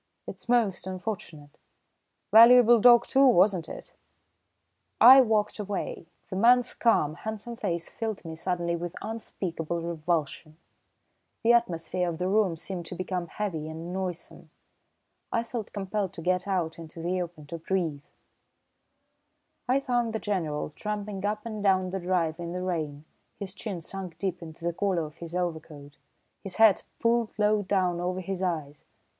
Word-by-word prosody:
"It's - - -9
most 220 -7 +1
unfortunate. 180 -6 -6 0.7
Valuable 240 +1 +8
dog, 240 +1 +7
too, 270 +1 +4
wasn't 185 -7 +3
it?" - - -9 1.1
I 265 +2 +10
walked 220 -3 +1
away. 200 -4 -4 0.2
The - - -3
man's 245 +5 +4
calm, 155 -11 +2
handsome 220 +6 -6
face 170 -7 -3
filled 220 -5 -5
me 160 -1 -6
suddenly 170 0 -1
with 170 0 -5
unspeakable 180 -6 -4
revulsion. 160 -2 -2 0.9
The 235 +1 +5
atmosphere 180 -5 0
of 165 - -4
the 180 - -1
room 195 -3 +2
seemed 175 +1 -6
to - - -6
become 185 -1 -3
heavy 165 -6 -4
and 165 +3 -7
noisome. 185 -2 -6 0.8
I 230 - +1
felt 230 -2 -6
compelled 195 -1 -3
to - - -8
get 180 +2 0
out 170 -4 -1
into 165 0 -10
the 180 +2 -1
open 170 -4 -7
to 165 +3 -7
breathe. 165 -4 -2 1.6
I 260 +2 +4
found 240 -4 -1
the 220 - -1
General 165 -9 -2
tramping 210 +1 -5
up 210 +1 -3
and 215 -2 -5
down 190 -2 +2
the 190 - -2
drive 175 -3 -1
in 170 0 -5
the 180 0 -3
rain, 155 -5 -3 0.3
his 195 -2 -6
chin 200 -4 -5
sunk 185 0 -7
deep 185 -2 -3
into 165 0 -10
the 170 - 0
collar 185 -2 0
of 150 +2 -12
his 170 0 -8
overcoat, 160 -5 -5 0.5
his 195 -2 -6
hat 220 -3 +5
pulled 230 -1 +1
low 210 0 +3
down 185 -3 0
over 180 +1 -2
his 190 0 -4
eyes. 155 -6 -3
185 Hz, 155 wpm, -27 LUFS, 170-210 Hz, 1.6 s, I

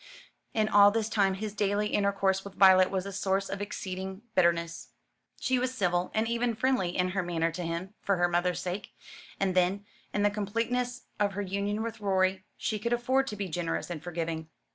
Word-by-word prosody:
In 215 -1 +2
all 205 -1 +7
this 220 +1 -1
time 195 -3 +2
his 210 +1 -4
daily 205 0 0
intercourse 195 -1 +1
with 200 -1 -10
Violet 185 -1 +7
was 190 -1 -2
a 200 - -5
source 195 0 0
of 195 +1 -4
exceeding 190 0 -5
bitterness. 170 -2 +1 0.5
She 260 -1 +1
was 255 +1 -1
civil, 180 -5 +1
and 220 +1 +2
even 235 0 0
friendly 230 -8 +1
in 180 0 +2
her 195 +1 -1
manner 165 -2 0
to 170 +3 -5
him 170 +3 -4
for 200 - +1
her 175 -1 +3
mother's 175 +1 0
sake. 185 +3 -5 0.5
And 195 -1 +1
then, 185 +3 +1 0.3
in 205 - 0
the 205 - +4
completeness 230 +4 -2 0.2
of 200 -1 +1
her 205 +1 -2
union 200 +3 -2
with 225 -1 -5
Rorie, 190 -1 +1
she 215 - -2
could 235 +3 -1
afford 260 +3 +1
to 210 - -4
be 200 -1 -3
generous 170 0 -3
and 160 -4 -5
forgiving. 165 -1 -4
195 Hz, 195 wpm, -29 LUFS, 180-210 Hz, 0.5 s, all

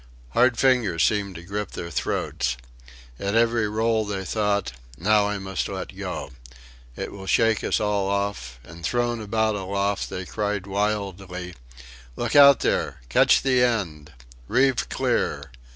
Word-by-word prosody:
Hard 120 - +3
fingers 115 - +3
seemed 100 -3 0
to 85 - -8
grip 100 +2 -5
their 85 0 -6
throats. 60 - -2 0.6
At 100 +2 -2
every 115 -2 +2
roll 110 +1 +1
they 100 -2 -4
thought: 105 - 0 0.3
Now 105 +4 +3
I 105 - -2
must 95 -2 -3
let - - -6
go. 70 - -5 0.6
It - - -5
will 95 -1 -9
shake 115 +1 +2
us - - +1
all 105 -2 0
off 100 -12 -2
and 85 +6 -13
thrown 120 +1 0
about 110 +1 0
aloft 100 0 -2
they 90 - -5
cried 105 -1 -2
wildly: 95 -3 -3 0.6
"Look 120 +2 -2
out 140 -2 +8
there 70 -1 -1
catch - - +4
the 130 -2 +3
end."... 90 -12 -1 0.4
"Reeve 130 - +2
clear"... 70 -1 -1
100 Hz, 145 wpm, -24 LUFS, 95-110 Hz, 0.6 s, out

